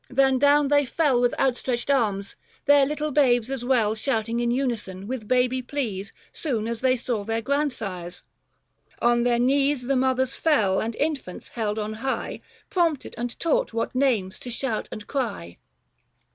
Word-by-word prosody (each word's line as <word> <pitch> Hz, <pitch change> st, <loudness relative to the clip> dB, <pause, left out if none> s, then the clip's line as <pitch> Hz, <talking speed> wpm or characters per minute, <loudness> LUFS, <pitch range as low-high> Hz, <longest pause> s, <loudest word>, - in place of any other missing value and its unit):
Then 265 Hz, 0 st, +3 dB
down 285 Hz, 0 st, +4 dB
they 290 Hz, 0 st, +4 dB
fell 265 Hz, -1 st, +1 dB
With 245 Hz, -1 st, +1 dB
outstretched 255 Hz, 0 st, 0 dB
arms, 205 Hz, -7 st, 0 dB, 0.3 s
their 285 Hz, -1 st, +6 dB
little 300 Hz, +1 st, -2 dB
babes 255 Hz, -4 st, +3 dB
as 265 Hz, -3 st, -3 dB
well 240 Hz, -4 st, +2 dB
Shouting 230 Hz, 0 st, -1 dB
in 240 Hz, 0 st, 0 dB
unison, 235 Hz, -7 st, -2 dB
with 235 Hz, -1 st, -5 dB
baby 255 Hz, +1 st, +2 dB
pleas 225 Hz, -8 st, -4 dB, 0.2 s
Soon 235 Hz, -8 st, -2 dB
as 230 Hz, -1 st, -4 dB
they 255 Hz, 0 st, +3 dB
saw 235 Hz, -3 st, -2 dB
their 225 Hz, +2 st, -2 dB
grandsires. 220 Hz, -11 st, -2 dB, 0.8 s
On 240 Hz, 0 st, +3 dB
their 240 Hz, 0 st, +2 dB
knees 275 Hz, +2 st, +2 dB
235 245 Hz, -, -9 dB
The 275 Hz, -, +3 dB
mothers 260 Hz, 0 st, +1 dB
fell, 210 Hz, -12 st, +2 dB
and 225 Hz, 0 st, -3 dB
infants 285 Hz, -, -3 dB
held 215 Hz, -2 st, -2 dB
on 215 Hz, 0 st, -3 dB
high, 265 Hz, 0 st, -3 dB, 0.3 s
Prompted 335 Hz, -7 st, 0 dB
and 240 Hz, +1 st, -5 dB
taught 330 Hz, -7 st, +1 dB
what 230 Hz, -, -2 dB
names 235 Hz, -8 st, +1 dB
to 250 Hz, -, -7 dB
shout 240 Hz, -2 st, -3 dB
and 215 Hz, -, -7 dB
cry. 215 Hz, -, -4 dB
245 Hz, 165 wpm, -25 LUFS, 220-275 Hz, 0.8 s, their